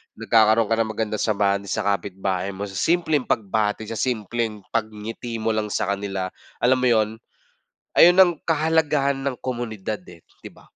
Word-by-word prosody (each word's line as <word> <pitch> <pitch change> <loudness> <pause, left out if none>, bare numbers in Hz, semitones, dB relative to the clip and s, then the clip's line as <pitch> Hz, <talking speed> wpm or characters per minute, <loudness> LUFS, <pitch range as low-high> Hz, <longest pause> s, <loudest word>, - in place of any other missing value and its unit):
nagkakaroon 110 0 +3
ka - - +5
ng 110 -1 0
magandang 110 -1 -2
samahan 100 -2 +1
sa 110 - -1
kapitbahay 95 -1 -2
mo 100 - -5
sa 95 -2 -5
simpleng 160 -5 +1
pagbati, 105 0 0
sa 115 - -4
simpleng 110 -3 -2
pagngiti 110 +1 -4
mo 110 0 -1
lang 110 -1 -1
sa 100 -1 -1
kanila, 100 -2 -3 0.3
alam 130 +1 +4
mo 125 - +2
yun. 110 -3 +3 0.9
Ayun 175 +1 +8
ang 175 -2 +7
kahalagahan 155 -3 +1
ng 135 -2 -1
komunidad 110 -6 -4
eh, 85 -2 -14 0.2
'di - - -9
ba? - - -19
110 Hz, 160 wpm, -23 LUFS, 100-125 Hz, 0.9 s, Ayun